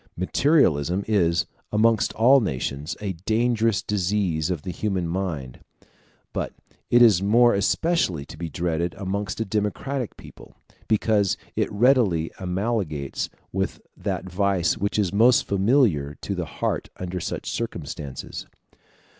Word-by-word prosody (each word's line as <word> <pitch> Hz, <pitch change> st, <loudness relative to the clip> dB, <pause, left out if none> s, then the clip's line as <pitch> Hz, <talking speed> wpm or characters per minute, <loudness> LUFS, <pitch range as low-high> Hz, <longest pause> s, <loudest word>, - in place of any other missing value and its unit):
Materialism 95 Hz, -, +2 dB
is, 85 Hz, -6 st, +2 dB, 0.3 s
amongst 110 Hz, 0 st, +3 dB
all 130 Hz, +5 st, +6 dB
nations, 70 Hz, -, -3 dB
a 100 Hz, -2 st, -2 dB, 0.2 s
dangerous 115 Hz, -1 st, +2 dB
disease 95 Hz, -5 st, 0 dB
of 85 Hz, -5 st, -3 dB
the 90 Hz, -, -4 dB
human 95 Hz, -1 st, -2 dB
mind; 85 Hz, -8 st, -4 dB, 0.7 s
but -, -, -3 dB, 0.4 s
it 120 Hz, 0 st, +6 dB
is 105 Hz, -7 st, +6 dB
more 120 Hz, +4 st, +5 dB
especially 100 Hz, -, +1 dB
to -, -, -11 dB
be 85 Hz, +1 st, -5 dB
dreaded 85 Hz, +2 st, -2 dB
amongst 100 Hz, 0 st, -3 dB
a 115 Hz, -, 0 dB
democratic 110 Hz, +5 st, -2 dB
people, -, -, -14 dB, 0.3 s
because 105 Hz, -3 st, +2 dB, 0.2 s
it -, -, 0 dB
readily 105 Hz, -8 st, +3 dB
amalgamates 90 Hz, -, -2 dB, 0.2 s
with -, -, -2 dB, 0.2 s
that -, -, -3 dB
vice 95 Hz, -1 st, +1 dB
which 100 Hz, +2 st, -2 dB
is 100 Hz, -4 st, +1 dB
most 120 Hz, +4 st, +5 dB
familiar 100 Hz, -, +2 dB
to 100 Hz, -, -4 dB
the 90 Hz, -3 st, -3 dB
heart -, -, -3 dB
under 90 Hz, 0 st, -4 dB
such -, -, -4 dB
circumstances. 75 Hz, -, -5 dB
100 Hz, 130 wpm, -24 LUFS, 85-110 Hz, 0.7 s, all